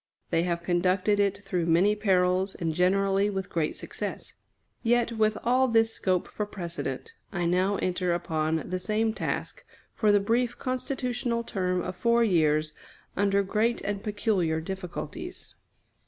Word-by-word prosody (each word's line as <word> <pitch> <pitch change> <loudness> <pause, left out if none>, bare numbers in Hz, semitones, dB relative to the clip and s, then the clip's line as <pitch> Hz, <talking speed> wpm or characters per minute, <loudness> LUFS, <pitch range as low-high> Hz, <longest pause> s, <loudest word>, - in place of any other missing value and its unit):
They 165 - +3
have 170 -1 -1
conducted 185 +4 +2
it 200 0 +1
through 180 -4 -1
many 180 +6 +4
perils, 190 -2 +2
and 165 -2 -2
generally 195 +3 +2
with 195 -1 -4
great 160 -3 -1
success. - - -5 0.5
Yet, 240 0 +2
with 215 -1 +1
all 255 +2 +3
this 225 -1 +3
scope 185 -2 0
for 210 - -4
precedent, 190 - -5 0.2
I 175 -4 -1
now 185 +3 +2
enter 180 -1 0
upon 160 -2 -1
the 185 0 -2
same 215 +4 0
task, - - -4 0.3
for 215 -2 +3
the 205 - +5
brief 235 +4 0
constitutional 250 -2 -2
term 185 -4 -1
of 185 - -4
four 235 +4 +3
years, 155 -6 +2 0.4
under 200 0 +2
great 220 +4 +1
and 200 0 -3
peculiar 205 -6 0
difficulties. 180 +1 -6
195 Hz, 145 wpm, -27 LUFS, 180-220 Hz, 0.5 s, the